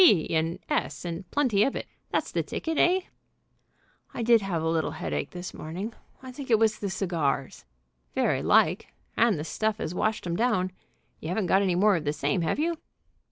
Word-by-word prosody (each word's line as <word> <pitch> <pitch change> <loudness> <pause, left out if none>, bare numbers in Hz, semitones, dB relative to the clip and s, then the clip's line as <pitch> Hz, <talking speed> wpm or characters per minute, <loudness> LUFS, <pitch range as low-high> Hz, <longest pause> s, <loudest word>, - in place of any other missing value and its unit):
B. 195 - +6
and 165 +2 +1
S., 140 +3 -1
and 175 +1 -5
plenty 250 -9 +2
of 275 - 0
it. - - -3 0.2
That's - - -1
the - - +1
ticket, 320 -1 -3
eh?" 365 +2 +4 1.1
"I 235 - -2
did 230 -1 +5
have 175 -5 -2
a - - 0
little 160 -1 +1
headache 75 -3 -2
this 180 0 -7
morning. 185 +9 -5 0.3
I 260 - -7
think 265 +1 -8
it 225 - +6
was 220 -1 +2
the 200 - -2
cigars." 160 - -1 0.5
"Very - - +2
like, - - +3 0.3
and 230 -5 +3
the 150 - -3
stuff 215 +5 -1
as 165 - -3
washed 215 +3 -1
'em 170 -1 -1
down. 185 -4 +1 0.5
You 155 - -6
haven't 190 +2 0
got 190 +3 +4
any 185 -3 +1
more 200 +2 +4
of 155 - -5
the 145 - +1
same, 145 +3 0
have 165 - 0
you?" 330 +2 0
185 Hz, 200 wpm, -27 LUFS, 165-225 Hz, 1.1 s, B